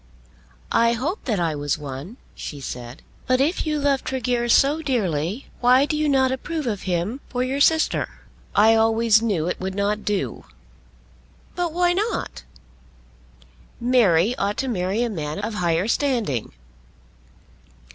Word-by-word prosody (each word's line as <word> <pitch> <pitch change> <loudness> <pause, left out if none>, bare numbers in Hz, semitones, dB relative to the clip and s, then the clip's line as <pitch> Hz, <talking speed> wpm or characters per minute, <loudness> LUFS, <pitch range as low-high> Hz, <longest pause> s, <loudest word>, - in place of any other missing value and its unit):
"I 230 0 +4
hoped 290 - -3
that 220 -7 0
I 165 -2 0
was 145 -1 -1
one," 145 - -8 0.2
she 145 - -7
said. 125 -1 -7 0.2
"But 255 0 +3
if 315 +4 +1
you 305 -1 0
love 280 -2 +1
Tregear 245 -2 -1
so 285 +6 +4
dearly, 205 - -1
why 255 +3 +5
do 305 - -2
you 300 0 +1
not 265 -2 +3
approve 310 +3 -3
of 205 -5 -3
him 180 +10 -1
for 250 -1 -1
your 270 +2 -2
sister?" 320 +2 +3 0.5
"I 220 +2 +6
always 225 0 +4
knew 195 -8 0
it - - -2
would 190 0 -4
not 205 +1 -1
do." 205 -2 -2 1.1
"But 350 -2 -2
why 350 +1 +2
not?" 425 +5 -2 1.4
"Mary 235 -4 +3
ought 200 +1 -1
to 270 - -1
marry 200 0 0
a - - 0
man 155 -5 -4
of 210 +2 -3
higher 175 -1 0
standing." 230 - 0
230 Hz, 145 wpm, -23 LUFS, 185-270 Hz, 1.4 s, I